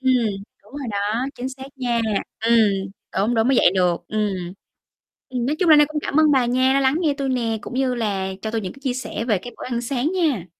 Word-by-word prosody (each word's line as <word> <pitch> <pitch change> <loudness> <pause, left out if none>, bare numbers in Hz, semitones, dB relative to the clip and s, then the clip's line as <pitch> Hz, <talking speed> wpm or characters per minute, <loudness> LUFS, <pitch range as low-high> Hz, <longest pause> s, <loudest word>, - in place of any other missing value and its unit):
Ừm. 260 0 +3 0.5
Đúng - - -21
rồi 280 -3 -5
đó, 210 +5 -1
chính 250 +2 -4
xác 265 0 -9
nha. 240 -3 0 0.4
Ừm, 230 +1 +4 0.6
đúng, 210 +5 +1
đúng, 225 +1 +2
mới 265 - +3
dậy - - +6
được. 180 -2 +1
Ừm. 195 -5 -2 0.8
Ừm, 250 -2 -2
nói 290 +4 0
chung 360 - +3
là 310 - +9
nay 295 0 +6
cũng 305 -1 -3
cảm 290 - +1
ơn 310 -1 +5
bà 260 -3 +3
nha, 255 +2 +2
đa 275 - +3
lắng 265 +1 +2
nghe 310 -5 +2
tui 275 -1 -1
nè, 230 -3 0
cũng - - -8
như 260 -1 0
là 195 -5 -2
cho 220 - -3
tui 225 0 -1
những 185 -3 -5
cái 275 - -16
chia 260 -3 -1
sẻ 250 -2 -4
về 220 -5 +2
cái 245 +7 -9
bữa - - -7
ăn 240 -1 -2
sáng 265 +5 -1
nha. 310 - 0
245 Hz, 250 wpm, -22 LUFS, 220-270 Hz, 0.8 s, là